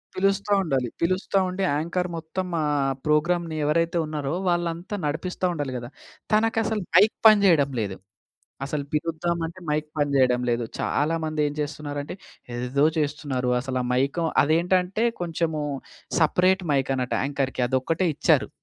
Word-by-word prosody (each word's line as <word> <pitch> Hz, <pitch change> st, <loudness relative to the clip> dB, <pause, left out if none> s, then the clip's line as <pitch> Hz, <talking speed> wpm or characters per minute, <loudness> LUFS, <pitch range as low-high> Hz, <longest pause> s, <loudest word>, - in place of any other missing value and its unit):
పిలుస్తా 195 Hz, +2 st, +1 dB
ఉండాలి. 135 Hz, -7 st, 0 dB
పిలుస్తా 185 Hz, +3 st, +1 dB
ఉండి, 185 Hz, +2 st, -3 dB
యాంకర్ 170 Hz, +4 st, -1 dB
మొత్తం 165 Hz, +3 st, -4 dB, 0.2 s
ఆహ్, 145 Hz, -2 st, +1 dB
ప్రోగ్రామ్‌ని 165 Hz, +2 st, +1 dB
ఎవరైతే 165 Hz, +3 st, +1 dB
ఉన్నారో, 150 Hz, -2 st, -3 dB, 0.2 s
వాళ్ళంతా 175 Hz, +2 st, -1 dB
నడిపిస్తా 175 Hz, +5 st, -2 dB
ఉండాలి 145 Hz, -5 st, -3 dB
గదా! 120 Hz, 0 st, -7 dB, 0.4 s
తనకసలు 220 Hz, -1 st, +2 dB
మైక్ 205 Hz, +4 st, +6 dB
పని 215 Hz, -1 st, +7 dB
జెయడం 150 Hz, -7 st, +4 dB
లేదు. 100 Hz, -3 st, -3 dB, 0.7 s
అసలు 145 Hz, +1 st, -3 dB
పిలుద్దామంటే 165 Hz, +2 st, -2 dB
మైక్ 150 Hz, 0 st, 0 dB
పని 145 Hz, -1 st, +1 dB
చేయడం 125 Hz, -2 st, +3 dB
లేదు. 120 Hz, 0 st, 0 dB
చాలామందేం 155 Hz, -1 st, 0 dB
చేస్తున్నారంటే, 145 Hz, 0 st, -5 dB, 0.4 s
ఎదేదో 125 Hz, +4 st, +1 dB
చేస్తున్నారు. 145 Hz, -4 st, -1 dB
అసలు 130 Hz, -1 st, -2 dB
ఆ -, -, -3 dB
మైకో 140 Hz, +6 st, +1 dB, 0.2 s
అదేంటంటే, 180 Hz, +7 st, +2 dB, 0.2 s
కొంచెము 165 Hz, -2 st, -1 dB, 0.6 s
సపరేట్ 185 Hz, +4 st, +3 dB
మైకన్నట్టు 135 Hz, -2 st, 0 dB
యాంకర్‌కి 135 Hz, -2 st, -1 dB
అదొక్కటే 135 Hz, +8 st, 0 dB
ఇచ్చారు. -, -, +2 dB
155 Hz, 125 wpm, -25 LUFS, 140-175 Hz, 0.7 s, పని